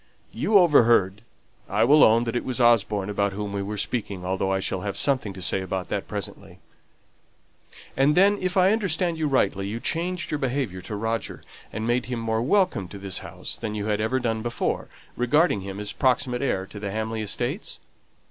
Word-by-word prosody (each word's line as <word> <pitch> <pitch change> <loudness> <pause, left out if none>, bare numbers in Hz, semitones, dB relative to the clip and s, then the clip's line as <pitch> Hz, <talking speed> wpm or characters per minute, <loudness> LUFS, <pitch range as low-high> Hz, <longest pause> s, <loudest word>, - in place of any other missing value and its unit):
You 210 - +3
overheard, 115 - +4 0.5
I 110 - +2
will 145 +6 +6
own 115 +2 +5
that 115 0 -3
it 120 - 0
was 130 0 -4
Osborne 105 -4 +3
about 100 -1 0
whom 100 0 -4
we 100 - -2
were 105 +2 -4
speaking, 100 -3 -3
though 95 +1 -1
I 95 - +1
shall 95 -1 -2
have 100 0 -4
something 135 -7 0
to 95 -1 -8
say 95 +2 0
about 95 0 -4
that 100 - -3
presently 100 -2 -7 1.4
and 140 +3 +3
then, 200 +2 +4
if 185 +1 -1
I 185 +1 +5
understand 180 -6 0
you 155 - +1
rightly, 100 -8 +1
you 110 +3 -4
changed 175 +6 -2
your 150 - -1
behaviour 130 - -2
to 105 +3 -6
Roger, 110 +1 -3 0.3
and 110 +1 -4
made 120 +2 0
him 125 -2 -3
more 110 0 -1
welcome 175 - +1
to 100 - -10
this 95 -2 -3
house - - -5
than 110 -2 -4
you 105 -1 -3
had 105 -1 0
ever 125 +4 0
done 115 -3 -1
before, 120 +1 -2 0.3
regarding 125 - +2
him 95 +1 -6
as 105 0 -3
proximate 125 -2 +1
heir 95 -9 -1
to 105 - -10
the 100 -1 -4
Hamley 110 +2 -3
estates?" 120 - -3
110 Hz, 195 wpm, -25 LUFS, 100-135 Hz, 1.4 s, will